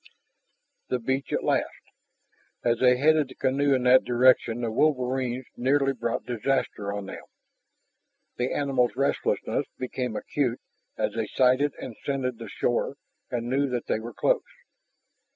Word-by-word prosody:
The 125 - +1
beach 130 +3 -2
at - - 0
last! - - +1 0.9
As 120 -1 +2
they 125 -1 +5
headed 155 +1 +4
the 130 - -13
canoe 140 +1 +2
in 130 - -1
that 125 +1 +6
direction 120 -1 +3
the 115 -2 -1
wolverines 130 -1 0
nearly 135 +2 +2
brought 120 -2 -3
disaster 120 -4 -1
on 100 -1 -4
them. 95 - -8 1.2
The 125 +1 -1
animals' 135 -4 +1
restlessness 140 +1 0
became 125 -2 -3
acute 125 -2 -1 0.4
as - - -1
they 110 -1 -2
sighted 130 +5 +2
and 120 - -7
scented 130 -4 -2
the 115 -3 -7
shore 120 +6 -1 0.3
and 120 -1 -3
knew 135 +2 +1
that 125 -2 -2
they - - 0
were 115 0 -8
close. - - +2
125 Hz, 145 wpm, -26 LUFS, 120-135 Hz, 1.2 s, that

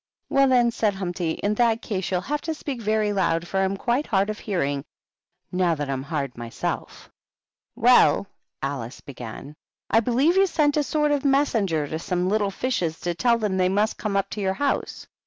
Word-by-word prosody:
"Well, 275 0 +4
then," 245 -2 +4
said 215 -3 0
Humpty, 175 -3 -2
"in 205 +1 +2
that 230 0 +2
case 190 -4 -3
you'll 180 -2 0
have 295 +7 -2
to 320 -1 -3
speak 275 -5 -5
very 215 -1 +1
loud, 170 -3 0
for 195 - -1
I - - +3
am 195 +1 -2
quite 250 +7 0
hard 200 0 +1
of 210 - -8
hearing, 145 -9 -1 0.7
now 180 -2 +2
that 145 -2 -3
I'm 130 -1 -2
hard 140 -3 -3
myself." 120 -1 -5 0.6
"Well," - - +5 0.4
Alice 135 -3 -4
began, 125 +1 -9 0.4
"I 225 - +6
believe 260 - +2
you 390 0 +5
sent 295 -4 +2
a 300 - +3
sort 300 +1 +1
of 285 -2 +1
messenger 225 - +2
to 160 +2 -4
some 180 +2 -1
little 205 -1 +1
fishes, 190 -7 -2
to 175 - -1
tell 235 +7 +2
them 210 -4 -1
they 185 0 +3
must 205 +3 0
come 205 -2 -1
up 195 - -1
to 210 - -4
your 190 -1 0
house. 285 +4 -2
200 Hz, 195 wpm, -24 LUFS, 170-240 Hz, 0.7 s, I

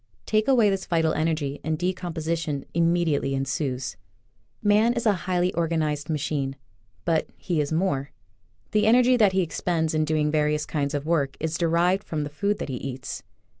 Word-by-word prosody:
Take 215 0 +1
away 235 -7 +5
this 195 -1 -3
vital 165 -2 +2
energy, 155 -3 -1
and 160 -1 -1
decomposition 165 -4 -2
im 170 0 +3
mediately 155 -6 +1
ensues, 135 -1 -2 0.7
Man 215 +3 +4
is 235 -1 -3
a 215 - +5 0.2
highly 180 0 +1
organized 155 -3 -1
machine 140 -3 -1 0.2
— 105 +1 -38
but 165 -2 +1
he 170 -5 -1
is 145 - -3
more. 150 -5 0 0.6
The 210 0 +3
energy 250 +2 +5
that 210 -5 +4
he 190 - +3
expends 165 -1 -1
in 155 0 +2
doing 155 -1 +1
various 150 0 +1
kinds 145 -1 -2
of 145 0 -3
work 145 -5 0
is 160 0 -2
derived 175 +3 +2
from 155 -2 -3
the 145 - -5
food 200 +7 0
that - - -5
he 130 - -3
eats. 135 0 -6
160 Hz, 175 wpm, -25 LUFS, 150-180 Hz, 0.7 s, away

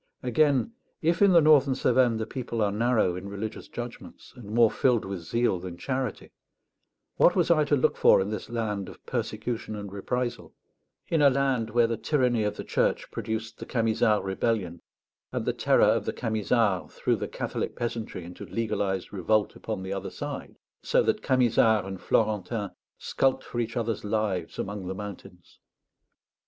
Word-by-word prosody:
Again, 140 - +2 0.3
if 165 +3 +2
in 200 -1 +7
the 170 -2 +7
northern 145 -3 +5
Cevennes 125 -2 +3
the 110 - -2
people 120 0 -5
are 100 - +1
narrow 110 -4 +2
in 95 +2 -6
religious 100 +2 -6
judgments, 120 0 -9
and 125 -4 -11
more 115 0 +4
filled 125 -4 +2
with 95 -1 -4
zeal 95 +3 0
than 90 -1 -7
charity, 130 +3 -3 0.9
what 175 - +5
was 175 -3 +3
I 155 -3 +4
to 145 - +3
look 130 - +2
for - - +6
in 95 +2 -1
this 110 - -5
land 105 -5 -2
of - - -14
persecution 110 -1 -3
and 100 -2 -7
reprisal 120 +3 -3 0.5
in 165 -2 +1
a 145 - +7
land 130 -4 0
where 120 +1 +3
the 115 0 -1
tyranny 120 -1 +1
of 105 - -1
the - - -5
Church - - 0
produced 110 0 -4
the - - -6
Camisard 110 -2 +2
rebellion, 95 -3 -1 0.5
and - - -3
the - - +1
terror - - +3
of - - +3
the - - -2
Camisards 110 -3 0
threw - - +1
the - - -4
Catholic - - -4
peasantry 115 -6 -4
into 90 +1 -9
legalized 100 -5 -2
revolt 105 +3 +1
upon 105 -4 -5
the 95 +1 -4
other 95 - -4
side, - - -6 0.3
so - - +2
that - - 0
Camisard 115 -5 +3
and 95 -1 -7
Florentin 105 -1 0 0.3
skulked 135 -1 0
for 120 - -5
each 115 +1 -2
other's 115 -2 -2
lives 105 -5 -2
among 100 -2 -4
the 95 - -4
mountains? 95 -3 -10
110 Hz, 170 wpm, -27 LUFS, 100-125 Hz, 0.9 s, in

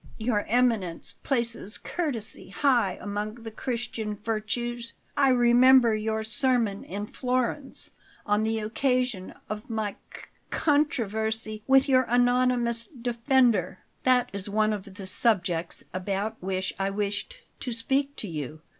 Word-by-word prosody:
Your 220 -2 0
Eminence 225 -8 +1
places 235 -5 0
courtesy 265 - -3
high 235 -4 +2
among 210 +1 -4
the 230 -2 -9
Christian 225 -3 -4
virtues. 230 +3 -3 0.2
I 275 -2 +4
remember 245 0 +6
your 220 0 -1
sermon 225 -2 +1
in 205 +3 -5
Florence, 255 +4 -3 0.3
on 210 0 +2
the 220 +1 0
occasion 250 -2 -1
of 215 +2 -6
my 220 -2 -1 0.2
c - - -10 0.3
controversy 220 -7 0
with 270 +1 +5
your 260 -1 +4
anonymous 245 -1 +4
defender." 240 - +1 0.2
"That 255 -1 +3
is 200 0 -4
one 215 +1 +2
of 200 -1 -6
the 195 0 -9
subjects 180 -4 0
about 195 +4 -2
which 185 0 -2
I 195 0 +1
wished 205 - -3 0.2
to 250 - -4
speak 270 +5 -1
to 215 - -6
you. 155 -2 -6
225 Hz, 130 wpm, -27 LUFS, 205-250 Hz, 0.3 s, remember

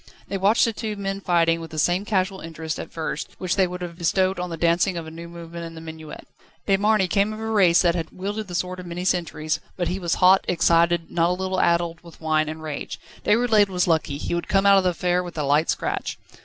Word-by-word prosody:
They 195 - -1
watched 200 +4 +4
the 230 - -1
two 215 0 -4
men 195 -1 -4
fighting, 165 -2 +2
with 165 - -8
the 155 - -8
same 175 +5 +1
casual 190 -3 0
interest, 160 0 -5
at - - -7
first, 160 -1 -4
which 185 -1 -1
they 190 -2 +3
would 180 0 -6
have 170 0 -7
bestowed 185 +2 +1
on 180 0 -3
the 165 - -5
dancing 170 +2 +2
of 165 - -5
a 160 - -9
new 170 +1 -9
movement 170 0 -8
in 165 0 -8
the - - -8
minuet. 160 -1 -9 0.4
De 195 - +3
Marny 205 -1 +2
came 200 +3 +1
of 215 - -7
a 220 - -5
race 195 -6 +4
that 170 -1 +3
had 165 -2 -3
wielded 205 +3 -5
the 175 - -6
sword 185 +1 -2
of 180 - -8
many 175 +1 -5
centuries, 155 -4 -1 0.2
but 175 -2 -1
he 185 - -2
was 170 -3 0
hot, 185 +1 +5
excited, 170 -1 +2
not 170 0 +2
a - - +2
little 190 0 -1
addled 170 -1 +1
with 170 -2 -15
wine 155 -1 +1
and 155 0 -7
rage. 155 -2 -5 0.2
Déroulède 220 -2 +4
was 180 -1 +1
lucky; 160 -4 0
he - - -4
would 170 - -2
come 195 0 +2
out 200 -1 +7
of - - -1
the - - +4
affair 180 0 0
with 175 -2 -8
a - - 0
slight 145 +3 +2
scratch. - - -2
175 Hz, 250 wpm, -23 LUFS, 165-190 Hz, 0.4 s, out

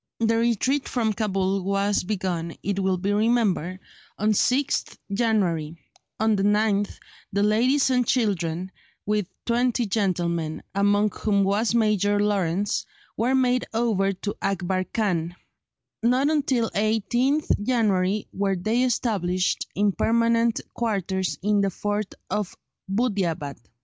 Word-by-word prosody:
The 230 0 +2
retreat 240 +4 +1
from 225 -4 0
Cabul 195 -2 0
was 200 +1 +1
begun, 180 -4 -3
it 200 -1 -1
will 190 -1 +1
be 200 +3 -1
remembered, 205 -5 +1 0.4
on 210 +2 +2
6th 255 +6 +1 0.2
January; 180 -8 0 0.4
on 220 0 +3
the 195 - 0
9th 205 0 +1 0.3
the 200 +1 +1
ladies 250 +6 +3
and 250 -2 +2
children, 185 -7 0 0.3
with 210 -2 0 0.2
twenty 240 0 +1
gentlemen, 175 -6 -1
among 205 +1 +2
whom 200 0 +1
was 205 +4 +1
Major 205 -2 +2
Lawrence, 200 -2 0 0.3
were 245 +4 +1
made 255 -1 +2
over 215 -4 +1
to 200 +2 -5
Akbar 190 -1 -1
Khan; 175 -7 -1 0.7
not 255 +5 +2
until 265 -6 +1
18th 240 +7 +1
January 205 -4 +1
were 195 0 0
they 215 +7 0
established 200 -7 0
in 205 0 +2
permanent 230 +2 +2
quarters 190 -5 -1
in 205 0 +2
the 195 - +2
fort 205 +2 -3
of 210 -3 -3 0.3
Buddeeabad. 190 - -1
205 Hz, 125 wpm, -24 LUFS, 190-230 Hz, 0.7 s, on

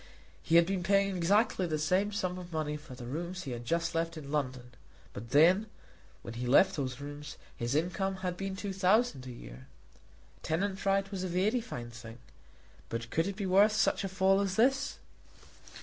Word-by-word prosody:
He 165 - +1
had 170 0 +7
been 190 0 -1
paying 195 +1 +2
exactly 190 +1 +2
the 155 -2 -1
same 185 +7 +1
sum 185 -3 -2
of 175 -1 -10
money 155 -2 -2
for 150 -3 -10
the 125 -1 -9
rooms 170 +8 -4
he 135 - -6
had 120 0 -6
just 170 +5 0
left 165 0 -1
in 140 -2 -8
London; 130 -4 -2 0.4
but 115 +3 -8
then, 175 - +5 0.6
while 115 - -7
he 120 +1 -3
held 165 - +8
those 135 -8 -4
rooms, 145 +1 -8 0.2
his 120 +3 -2
income 190 +4 0
had 180 -1 -1
been 195 +1 -4
two 200 0 -4
thousand 190 - +2
a - - -6
year. 65 - -11 0.7
Tenant 195 +4 -2
right 195 0 +1
was 190 -2 -3
a - - -1
very 195 +7 +1
fine 120 - -7
thing, 120 -1 -10 0.7
but 115 0 -5
could 165 +3 +1
it 200 - -3
be 200 0 -3
worth 200 +3 +5
such 215 - +2
a 195 - -2
fall 190 +1 +3
as 195 -2 -1
this? 270 +5 +2
175 Hz, 195 wpm, -31 LUFS, 140-195 Hz, 0.7 s, held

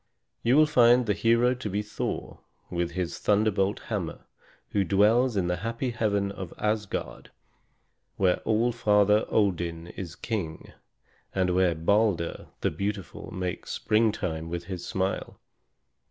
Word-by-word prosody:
You 120 +4 +3
will 155 - +7
find 125 -4 +5
the 105 - +2
hero 115 +4 +3
to 125 -4 -5
be 100 +2 -1
Thor, 105 - -4 0.3
with 85 -1 -1
his 90 -1 -3
thunderbolt 105 -1 +1
hammer, - - -4 0.5
who 100 - +2
dwells 105 +6 +3
in 95 - +1
the 90 0 0
happy 115 +6 -3
heaven 100 -3 0
of 95 -3 -8
Asgard, 105 -1 -3 0.9
where 90 -2 +3
All 115 +3 +1
Father 105 -2 +3
Odin 85 -5 0
is 85 -2 -7
king, 85 -7 -4 0.6
and 95 -1 +2
where 90 -2 +3
Balder 90 0 +1
the - - +1
beautiful 100 -1 -4
makes 90 -1 -4
springtime 95 -7 0
with 85 0 -4
his 90 -1 -6
smile. 95 0 -2
100 Hz, 135 wpm, -27 LUFS, 90-110 Hz, 0.9 s, will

